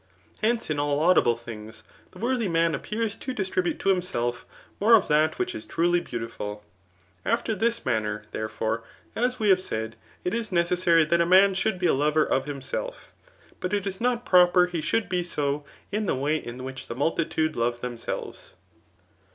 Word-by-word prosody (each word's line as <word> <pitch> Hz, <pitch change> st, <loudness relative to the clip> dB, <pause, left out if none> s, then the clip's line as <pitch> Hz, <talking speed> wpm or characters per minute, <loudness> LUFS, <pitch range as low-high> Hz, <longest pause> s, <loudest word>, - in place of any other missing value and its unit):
Hence, 225 Hz, -4 st, +1 dB
in 145 Hz, -, 0 dB
all 145 Hz, 0 st, +1 dB
laudable 155 Hz, -7 st, +4 dB
things, 110 Hz, -1 st, -9 dB, 0.3 s
the -, -, -16 dB
worthy 240 Hz, -1 st, 0 dB
man 165 Hz, -1 st, +2 dB
appears 215 Hz, +6 st, -2 dB
to 260 Hz, -1 st, -5 dB
distribute 185 Hz, -3 st, -1 dB
to 195 Hz, -, +1 dB
himself 175 Hz, -11 st, -1 dB, 0.3 s
more 225 Hz, +3 st, +7 dB
of 210 Hz, -, +3 dB
that 155 Hz, +1 st, +3 dB
which 370 Hz, 0 st, -1 dB
is 330 Hz, -2 st, -6 dB
truly 175 Hz, -, +1 dB
beautiful. 115 Hz, -7 st, -6 dB, 0.6 s
After 230 Hz, 0 st, 0 dB
this 230 Hz, +3 st, 0 dB
manner, 105 Hz, -3 st, -1 dB
therefore, 110 Hz, +1 st, -2 dB, 0.3 s
as 250 Hz, +2 st, 0 dB
we 215 Hz, -2 st, +2 dB
have 185 Hz, -1 st, +5 dB
said, 110 Hz, -8 st, -4 dB, 0.3 s
k 180 Hz, -, -1 dB
is 230 Hz, -3 st, -3 dB
necessary 170 Hz, -1 st, +3 dB
that 170 Hz, +2 st, +2 dB
a -, -, +3 dB
man 190 Hz, +2 st, +6 dB
should 190 Hz, +2 st, 0 dB
be 180 Hz, -, -2 dB
a -, -, +4 dB
lover 150 Hz, +3 st, +2 dB
of 135 Hz, -, 0 dB
himself, 145 Hz, -, -5 dB, 0.5 s
but 180 Hz, +2 st, -3 dB
it 200 Hz, -, -2 dB
is 195 Hz, 0 st, -4 dB
not 245 Hz, 0 st, 0 dB
proper 180 Hz, 0 st, +6 dB
he 175 Hz, -2 st, -3 dB
should 225 Hz, +7 st, 0 dB
be 180 Hz, -1 st, 0 dB
so 145 Hz, -4 st, -2 dB, 0.3 s
in 210 Hz, 0 st, -1 dB
the -, -, +1 dB
way 145 Hz, +4 st, 0 dB
in 125 Hz, -3 st, -7 dB
which 130 Hz, 0 st, -7 dB
the 115 Hz, -, -5 dB
multitude 155 Hz, +2 st, 0 dB
love 120 Hz, +1 st, 0 dB
tbemsehes. 120 Hz, -1 st, -6 dB
170 Hz, 180 wpm, -26 LUFS, 130-200 Hz, 0.6 s, more